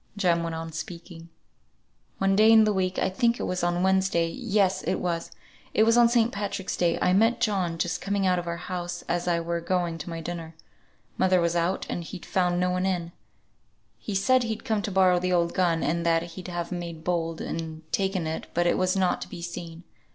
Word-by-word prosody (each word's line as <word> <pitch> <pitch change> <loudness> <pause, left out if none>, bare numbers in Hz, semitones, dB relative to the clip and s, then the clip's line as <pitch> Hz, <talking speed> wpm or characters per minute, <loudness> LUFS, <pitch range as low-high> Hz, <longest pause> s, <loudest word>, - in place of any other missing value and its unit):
Jem 175 -4 +2
went 165 -1 -3
on 165 0 -5
speaking. 170 +1 -8 0.9
"One 195 0 +2
day 215 +2 +6
in 220 -1 +8
the 215 -1 +2
week 185 -1 -1
I - - +2
think 235 +5 +1
it - - -2
was 180 - -2
on 175 0 +1
the - - -1
Wednesday, 190 -3 +2
yes, 205 -4 +1
it - - -1
was, 170 -2 -2 0.5
it 215 - +5
was 230 +1 +4
on 240 -1 +6
St. 235 -1 +3
Patrick's 200 -1 -3
day, 170 -2 +1
I 180 - +2
met 225 +4 +3
John 190 -8 0
just 165 0 -2
coming 200 0 0
out 180 -1 +3
of 175 - -6
our 170 0 -2
house, 175 0 -5
as 175 +1 -1
I 170 -1 +2
were 170 0 -2
going 170 -1 -1
to 155 - -6
my 165 -1 -5
dinner. 165 -1 -6 0.6
Mother 185 -1 +4
was 170 0 +1
out, 170 +2 0
and 175 - -3
he'd 175 +2 -9
found 180 -1 +1
no 180 0 +1
one 185 +1 0
in. 175 -3 -2 0.9
He 205 - -5
said 255 +7 +3
he'd 225 -2 -4
come 220 -2 0
to 205 - -4
borrow 185 -1 +4
the 180 0 0
old 170 -1 +2
gun, 170 -3 +1
and 170 +3 0
that 165 0 +2
he'd 185 +1 -8
have 175 -1 -4
made 170 -3 -5
bold, 165 -2 -1
and 160 -1 -5
taken 190 -3 0
it, 160 0 -4
but 175 +1 +2
it 175 - +2
was 185 0 +1
not 185 -2 +1
to - - -6
be 170 -2 -8
seen. 170 -1 -7
180 Hz, 225 wpm, -26 LUFS, 170-195 Hz, 0.9 s, in